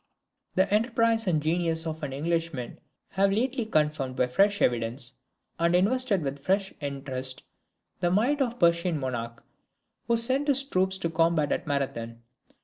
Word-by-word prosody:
The 190 +1 +3
enterprise 230 0 +2
and 155 -4 +1
genius 165 0 +1
of 160 0 -4
an 145 -3 -4
Englishman 160 -3 -3 0.3
have 195 0 +2
lately 245 +2 -1
confirmed 150 -7 0
by 125 - +2
fresh 200 +11 +2
evidence, 120 +2 0 0.5
and 170 +1 +2
invested 205 0 +2
with 140 0 -5
fresh 190 +2 0
interest, 135 -2 -4 0.6
the 175 - +1
might 245 +10 +2
of 245 -3 +1
the 215 -8 +3
Persian 170 -1 +1
monarch, 115 -3 -5 0.6
who 235 - +3
sent 260 +5 +2
his 275 -1 +3
troops 190 -7 0
to 170 -3 -2
combat 165 -2 +2
at - - -2
Marathon. 115 -5 -3
170 Hz, 150 wpm, -27 LUFS, 140-205 Hz, 0.6 s, The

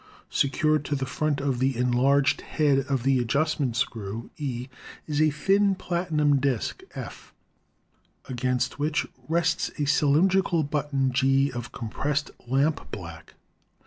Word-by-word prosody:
Secured 155 +2 +2
to 145 - -1
the 135 -1 -2
front 145 +3 -1
of 135 -3 -1
the 130 -1 +1
enlarged 130 +4 +3
head, 145 -3 +2
e, - - -1
of 135 -4 0
the 135 -1 +3
adjustment 140 0 0
screw, 115 -3 -3
E 130 -4 -4 0.4
is 150 -1 -1
a 155 - +5
thin 195 +6 +2
platinum 160 -6 +1
disk, 130 -4 -1
F, - - -9 0.9
against 125 +1 -1
which 150 +1 0 0.2
rests 165 0 +1
a 150 - 0
cylin 150 +3 +4
drical 180 -5 +1
button, 140 -2 0
G, 135 +2 +2
of 120 -1 -6
compressed 140 +5 -2 0.2
lampblack. 130 - -2
140 Hz, 135 wpm, -26 LUFS, 125-155 Hz, 0.9 s, a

